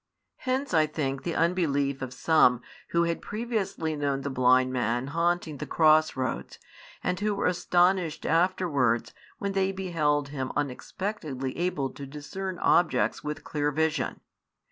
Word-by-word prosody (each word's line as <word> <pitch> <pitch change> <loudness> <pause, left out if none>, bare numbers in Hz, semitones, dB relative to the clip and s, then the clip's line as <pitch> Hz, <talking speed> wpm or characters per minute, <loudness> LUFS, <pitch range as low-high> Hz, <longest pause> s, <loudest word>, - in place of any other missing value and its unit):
Hence, 260 -2 -2
I 155 -2 +4
think, 135 -3 -2
the 170 +3 -3
unbelief 145 -6 +1
of 130 -2 -4
some 125 -3 +3 0.2
who 170 0 +2
had 170 0 -1
previously 210 -8 -2
known 140 -2 -1
the 140 +1 -3
blind 130 0 +3
man 120 0 0
haunting 165 +1 0
the - - -6
cross 155 -1 +4
roads, 130 -2 -3 0.5
and 180 0 -1
who 210 0 0
were 200 - -1
astonished 180 -1 +2
afterwards 150 -10 +1 0.2
when 200 -1 -2
they 195 0 +1
beheld 155 -7 0
him 135 -2 -4
unexpectedly 145 -1 -3
able 160 -6 -1
to 140 - -9
discern 180 +7 -6
objects 175 -1 +2
with 150 0 -4
clear 150 -1 -1
vision. 155 0 -1
155 Hz, 145 wpm, -27 LUFS, 135-180 Hz, 0.5 s, I